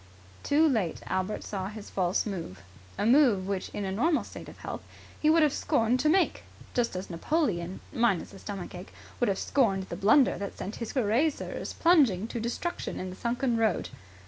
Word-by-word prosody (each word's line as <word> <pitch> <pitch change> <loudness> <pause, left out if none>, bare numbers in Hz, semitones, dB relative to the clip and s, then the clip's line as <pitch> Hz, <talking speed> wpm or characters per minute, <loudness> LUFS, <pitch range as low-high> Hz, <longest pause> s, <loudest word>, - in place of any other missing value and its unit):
Too 310 +3 +4
late 215 - 0
Albert 190 +3 -2
saw 190 -2 -4
his 210 0 -9
false 185 -1 +1
move 165 - -6 0.3
a - - 0
move 235 -6 +5
which 195 -2 -2
in 205 - -4
a 190 - -2
normal 300 - +2
state - - -10
of - - -13
health, - - -6 0.4
he 305 - +3
would 320 0 +5
have 295 - +3
scorned 230 +3 +1
to 305 +4 +3
make. 365 +2 +2 0.3
Just 240 -5 0
as 185 0 -5
Napoleon, 185 - -1
minus 230 -7 +1
a 195 - -11
stomach 195 -3 -6
ache, 180 +1 -9 0.3
would 245 - +2
have 195 - 0
scorned 195 -8 +1
the - - -4
blunder 220 +8 +4
that 200 -1 -5
sent 205 - -5
his 230 - -5
Cuirassiers 260 +5 0
plunging 265 - +4
to 235 - -3
destruction 240 +10 -3
in 185 0 -4
the - - -8
sunken 240 +2 0
road. 220 -4 +1
220 Hz, 190 wpm, -28 LUFS, 190-265 Hz, 0.4 s, move